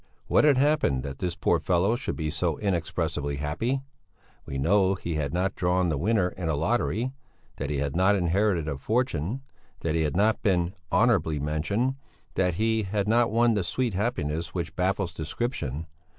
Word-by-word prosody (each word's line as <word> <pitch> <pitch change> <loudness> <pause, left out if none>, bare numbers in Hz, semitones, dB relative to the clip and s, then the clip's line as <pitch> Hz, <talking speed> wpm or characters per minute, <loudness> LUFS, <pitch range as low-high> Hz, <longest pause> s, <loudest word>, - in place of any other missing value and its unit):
What - - +4
had 145 -3 +5
happened 135 - +2
that 70 -1 -6
this 90 -2 -2
poor - - +2
fellow 95 +5 +2
should 120 - -3
be 75 -1 -2
so 80 -1 0
inexpressibly 80 -6 -1
happy? 110 - -1 0.6
We 70 - -4
know 95 +7 +3
that 90 - -15
he 85 - -2
had 75 -3 -1
not 95 +3 0
drawn 90 0 +1
the 75 - 0
winner 100 +1 +2
in 90 -2 -4
a 80 - +1
lottery, 115 - 0 0.4
that 70 - -3
he 75 - -1
had 70 +2 -2
not 95 +3 +4
inherited 90 -2 +1
a 70 -3 -3
fortune, 115 - -1 0.4
that 80 - -1
he 80 - +1
had 75 -2 0
not 110 +2 +3
been 90 -4 +1 0.2
"honourably 95 -11 +3
mentioned," 85 - 0 0.4
that 90 -2 +1
he 110 +2 +1
had 100 0 -1
not 115 +2 +3
won 115 +1 +3
the 105 -3 0
sweet 120 +5 -1
happiness 85 -7 -2
which 85 -1 -3
baffles 95 -1 0
description. 80 - -3
90 Hz, 180 wpm, -27 LUFS, 80-110 Hz, 0.6 s, had